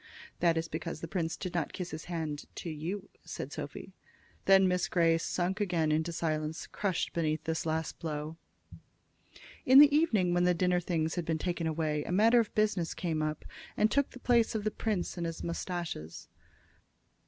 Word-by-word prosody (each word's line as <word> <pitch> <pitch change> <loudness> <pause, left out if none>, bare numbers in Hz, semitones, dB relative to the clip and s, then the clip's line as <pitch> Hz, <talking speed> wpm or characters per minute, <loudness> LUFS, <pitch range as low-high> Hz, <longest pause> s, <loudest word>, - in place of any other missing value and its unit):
"That 170 -1 +3
is 165 0 -1
because 160 0 -5
the 165 - -4
prince 165 -2 -2
did 185 -2 -5
not 170 -3 -2
kiss 180 -2 -5
his 155 0 -6
hand 160 -4 -4
to 170 - -5
you," 180 +6 -5
said - - -6
Sophy. - - -7 0.5
Then 195 -1 +6
Miss 180 -1 +1
Grey 165 -2 +3
sunk 185 +4 -1
again 170 -6 +1
into 160 +2 +1
silence, 155 -1 -2
crushed 195 -4 -2
beneath 160 -2 -1
this 160 0 -2
last 160 0 -2
blow. 155 -1 -4 1.3
In 260 +1 +6
the 290 0 +9
evening, 215 - +3
when 175 0 +3
the 180 0 +3
dinner 180 +1 +2
things 165 -2 -1
had 175 -2 -2
been 160 0 0
taken 170 0 -2
away, 155 -2 -1
a - - -5
matter 225 +6 +5
of 225 - 0
business 210 -6 +1
came 160 -3 -1
up, 155 0 -3 0.3
and 215 0 +3
took 280 +2 +2
the 255 - -12
place 235 -2 +2
of 215 - -1
the 215 - 0
prince 205 -6 -2
and 170 -1 -2
his 165 - -6
mustaches. 170 - -4
170 Hz, 185 wpm, -31 LUFS, 160-190 Hz, 1.3 s, the